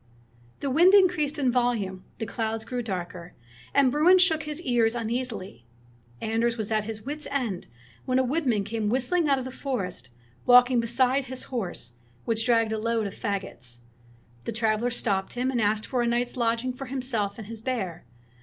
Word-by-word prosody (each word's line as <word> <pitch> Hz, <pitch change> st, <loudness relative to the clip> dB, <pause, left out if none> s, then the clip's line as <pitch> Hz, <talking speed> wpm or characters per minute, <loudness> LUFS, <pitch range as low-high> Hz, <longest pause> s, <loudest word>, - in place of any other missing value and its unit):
The 275 Hz, -, -1 dB
wind 350 Hz, +8 st, +6 dB
increased 320 Hz, -6 st, +3 dB
in 265 Hz, -4 st, +2 dB
violence, 230 Hz, -7 st, 0 dB, 0.2 s
the 225 Hz, -, -3 dB
clouds 220 Hz, 0 st, -3 dB
grew 250 Hz, -1 st, -3 dB
darker, 180 Hz, -5 st, -6 dB, 0.4 s
and 275 Hz, -2 st, +4 dB
Bruin 330 Hz, +7 st, +6 dB
shook 330 Hz, -4 st, +4 dB
his 300 Hz, 0 st, -3 dB
ears 235 Hz, -4 st, +2 dB
un 230 Hz, -1 st, -2 dB
easily. 230 Hz, -, -4 dB, 0.6 s
Anders 230 Hz, +2 st, 0 dB
was 220 Hz, -1 st, -3 dB
at 215 Hz, -1 st, +1 dB
his 215 Hz, -1 st, -6 dB
wits' 300 Hz, +2 st, -3 dB
end, 245 Hz, -10 st, -2 dB, 0.4 s
when 255 Hz, 0 st, +1 dB
a 260 Hz, -, +4 dB
woodman 255 Hz, -6 st, +1 dB
came 215 Hz, 0 st, -2 dB
whistling 285 Hz, +7 st, +1 dB
out 275 Hz, -, +4 dB
of 260 Hz, -, -4 dB
the 260 Hz, -, -5 dB
forest, 195 Hz, -, -3 dB, 0.4 s
walking 250 Hz, 0 st, +7 dB
beside 255 Hz, +3 st, +2 dB
his 260 Hz, 0 st, -4 dB
horse, 175 Hz, -, -3 dB, 0.3 s
which 225 Hz, 0 st, +1 dB
dragged 230 Hz, -2 st, +3 dB
a 220 Hz, -, -1 dB
load 230 Hz, 0 st, 0 dB
of 200 Hz, -, -4 dB
fagots. 190 Hz, -, -4 dB, 0.7 s
The -, -, -2 dB
traveler 225 Hz, +1 st, +1 dB
stopped 200 Hz, -5 st, -1 dB
him 250 Hz, +2 st, -1 dB
and 240 Hz, -3 st, 0 dB
asked 215 Hz, +1 st, +1 dB
for 250 Hz, -2 st, -1 dB
a 240 Hz, -, +1 dB
night's 240 Hz, +1 st, 0 dB
lodging 235 Hz, +1 st, 0 dB
for 270 Hz, +2 st, -7 dB
himself 250 Hz, -6 st, -1 dB
and 220 Hz, -, -7 dB
his 225 Hz, +1 st, -8 dB
bear. 200 Hz, -9 st, -3 dB
235 Hz, 180 wpm, -26 LUFS, 215-260 Hz, 0.7 s, walking